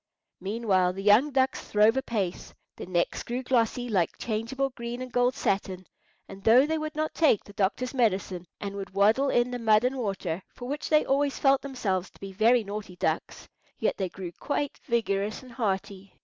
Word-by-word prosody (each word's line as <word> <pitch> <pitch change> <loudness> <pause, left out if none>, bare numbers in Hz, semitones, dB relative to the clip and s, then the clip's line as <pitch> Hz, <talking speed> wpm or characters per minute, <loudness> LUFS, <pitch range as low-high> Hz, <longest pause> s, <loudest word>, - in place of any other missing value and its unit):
Meanwhile 195 -3 +1
the 195 +1 -6
young 210 +8 +5
ducks 265 -1 +1
throve 215 +2 +3
apace. 215 -9 -3 0.2
Their - - -8
necks 175 -1 0
grew 245 +2 -4
glossy, 245 -1 +1
like 190 -8 0
changeable 240 +5 -2
green 235 0 -6
and 255 0 -6
gold 245 +1 +2
satin, 190 -1 -1 0.4
and 195 0 -11
though 240 +6 +6
they 320 +1 -1
would 310 0 -5
not 310 0 -2
take 300 -10 +3
the 205 - -14
doctor's 210 +6 -1
medicine, 190 -7 0
and 200 -1 -5
would 195 -1 -7
waddle 220 +8 +4
in 240 0 +2
the 245 - -3
mud 220 -1 +4
and 255 +2 +1
water—for 195 +1 -4
which 290 +3 -4
they 305 -1 +4
always 280 +1 +1
felt 270 -1 +3
themselves 200 -9 -2
to - - -23
be 195 0 -7
very 225 +5 +3
naughty 200 -2 -6
ducks—yet - - -3
they 190 -2 -2
grew 180 -1 -7
quite 285 -1 -2
vigorous 215 -2 -1
and 255 - -13
hearty. 195 -4 -3
225 Hz, 180 wpm, -27 LUFS, 195-255 Hz, 0.4 s, though